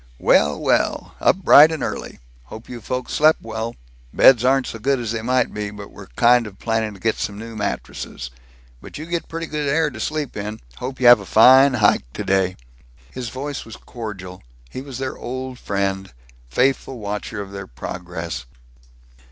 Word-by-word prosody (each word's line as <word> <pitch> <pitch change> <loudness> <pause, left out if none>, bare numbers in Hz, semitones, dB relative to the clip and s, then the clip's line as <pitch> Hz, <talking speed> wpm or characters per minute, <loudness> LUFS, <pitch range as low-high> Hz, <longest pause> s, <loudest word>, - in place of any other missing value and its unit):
"Well, 75 +3 +3
well! - - 0
Up - - +4
bright 155 +1 +8
and 160 - -3
early! - - -5 0.3
Hope 110 - -11
you 120 -2 -8
folks 125 +3 -4
slept 155 +1 +4
well. 110 +1 -5 0.4
Beds 120 -3 +6
aren't 135 0 +3
so 115 - -6
good 135 +4 +1
as 115 -3 -3
they 115 -1 -3
might 125 +2 +1
be, 105 -1 -4
but 100 -1 -10
we're - - -12
kind 120 - +4
of 100 -2 -12
planning 110 -2 -2
to - - -14
get 110 +3 0
some 100 - -4
new 115 +1 -8
mattresses. 65 - -5 0.5
But - - -10
you 155 - -6
get 170 0 -3
pretty 165 0 -4
good 150 -2 -3
air 155 +1 +1
to 115 - -10
sleep 150 +3 -3
in. 105 +1 -5 0.2
Hope 130 +1 -6
you 130 - 0
have 120 -1 +9
a 100 - -9
fine 130 +4 +7
hike 105 - +2
today." 95 -1 0 0.5
His 125 -2 -5
voice 140 +3 -5
was 115 - -11
cordial; 95 -6 -8 0.3
he 130 - -6
was 135 -2 -8
their 130 0 -4
old 130 0 -6
friend; 95 -1 -2 0.4
faithful 130 - 0
watcher 105 0 -5
of 100 -1 -7
their 100 -1 -7
progress. 85 +1 -6
115 Hz, 185 wpm, -21 LUFS, 100-130 Hz, 0.5 s, have